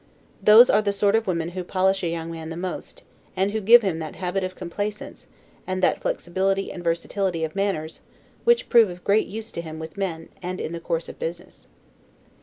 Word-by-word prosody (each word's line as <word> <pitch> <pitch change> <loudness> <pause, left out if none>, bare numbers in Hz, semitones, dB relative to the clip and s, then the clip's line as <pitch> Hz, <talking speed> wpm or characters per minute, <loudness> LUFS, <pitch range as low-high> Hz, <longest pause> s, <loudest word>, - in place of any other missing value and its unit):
Those 220 +4 +8
are - - +4
the 200 -1 0
sort 200 0 +2
of 225 -1 +1
women 170 -2 -1
who 180 +1 -5
polish 190 +2 +1
a - - +1
young 165 0 -4
man 160 -1 -7
the 165 - -6
most, 185 - -6 0.3
and 195 +2 +1
who 220 +1 -2
give 230 +3 +7
him 180 -5 -1
that 155 -1 -6
habit 185 +1 -2
of 185 0 -4
complaisance, 205 +4 -5 0.4
and 185 0 -2
that - - +2
flexibility 195 +2 -1
and 175 - -8
versatility 170 +1 -1
of 160 +2 -3
manners 195 -6 -2 0.4
which 475 0 +3
prove 230 -4 +6
of 175 0 -10
great 205 +2 +2
use 220 +2 -6
to 170 - -4
him 160 -1 -8
with 160 +4 -8
men, 170 -5 -3
and 185 +1 -4
in - - -4
the 170 - -5
course 165 -1 -2
of - - -10
business. 170 +2 -7
185 Hz, 210 wpm, -24 LUFS, 170-200 Hz, 0.4 s, Those